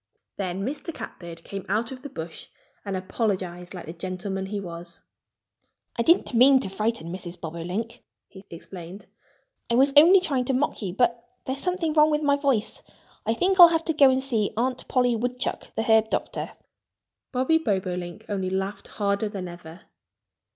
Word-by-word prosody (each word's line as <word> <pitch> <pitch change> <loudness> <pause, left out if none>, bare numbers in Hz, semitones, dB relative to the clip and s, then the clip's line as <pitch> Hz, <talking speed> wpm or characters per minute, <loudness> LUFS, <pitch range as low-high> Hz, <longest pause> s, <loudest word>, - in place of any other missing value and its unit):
Then 190 0 -3
Mr. 295 +6 -4
Catbird 170 - -9
came 195 -1 -6
out 220 +4 0
of 255 -1 -8
the 285 - -7
bush 160 -6 -8 0.4
and 195 -2 -3
apologized 185 -2 -3
like 180 - -7
the 165 - -7
gentleman 190 +2 -4
he 205 +1 -3
was. 170 -2 -7 0.9
"I - - 0
didn't 335 +3 +3
mean 260 +3 +7
to 195 - -2
frighten 210 -4 -2
Mrs. 180 -1 -6
Bobolink," 180 +8 -5 0.2
he 190 -1 -13
explained. 175 +3 -9 0.6
"I 235 - +2
was 275 +3 +4
only 340 +6 +9
trying 275 -9 -1
to 265 - 0
mock 275 -1 0
you. 190 -3 -4
But 235 0 +1 0.2
there's 265 +1 -2
something 360 -4 0
wrong 305 0 +5
with 300 0 0
my 285 -1 +4
voice. 275 -7 0 0.5
I 225 - +2
think 375 +8 +1
I'll 350 - +13
have 330 -1 0
to 320 - +1
go 280 -3 +6
and 260 0 +1
see 225 -6 0
Aunt 255 +2 -1
Polly 245 -2 +2
Woodchuck, 245 +2 -2
the 225 - 0
herb 220 -1 +4
doctor." - - -3 0.8
Bobby 260 +5 +2
Bobolink 185 - -3
only 190 -2 -2
laughed 195 +1 -3
harder 200 +1 -1
than 195 -3 -5
ever. 175 0 -11
215 Hz, 170 wpm, -25 LUFS, 185-265 Hz, 0.9 s, I'll